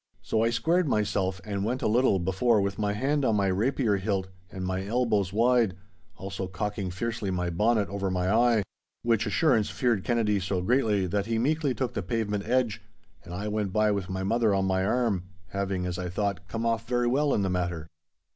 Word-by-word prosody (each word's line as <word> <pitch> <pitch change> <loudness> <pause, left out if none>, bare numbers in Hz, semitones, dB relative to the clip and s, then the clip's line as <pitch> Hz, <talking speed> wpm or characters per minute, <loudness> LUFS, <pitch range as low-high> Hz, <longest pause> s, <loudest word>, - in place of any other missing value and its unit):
So 110 - 0
I 115 - +3
squared 165 +9 +1
myself, 100 -5 0
and 100 -2 -2
went 125 +5 -2
a - - +2
little 115 -1 +3
before 95 +6 +2
with 100 0 -1
my 105 -1 0
hand 140 +7 0
on 115 -4 +2
my 100 -1 +2
rapier 105 +3 +1
hilt 95 -1 -2 0.2
and 95 -1 -5
my 95 +1 -2
elbows 105 -3 +1
wide, 115 -2 +3 0.4
also 95 0 -5
cocking 100 +1 -3
fiercely 110 +2 -3
my 90 -1 -1
bonnet 105 +4 +2
over 100 -1 -2
my 90 0 -1
eye—which 115 0 0
assurance 110 0 +2
feared 120 -7 0
Anthony 110 -4 +2
so 95 0 -1
greatly 110 -4 +2
that 100 +3 -1
he 115 -1 0
meekly 145 +2 +1
took 130 -3 -2
the - - -2
pavement 105 +1 -2
edge, 120 -3 +1 0.4
and - - -11
I 100 +3 -4
went 105 -3 -2
by 110 0 +3
with 100 -2 -2
my 95 0 -3
mother 110 0 +2
on 95 0 +1
my 95 0 +1
arm, 105 -4 0 0.2
having, 95 -1 -2
as 90 0 -3
I 90 -1 -3
thought, 100 0 -2
come 115 +6 -3
off 115 0 0
very 120 0 +1
well 140 +4 +2
in 100 - +1
the 95 - 0
matter. 90 -3 -2
105 Hz, 200 wpm, -27 LUFS, 95-115 Hz, 0.4 s, I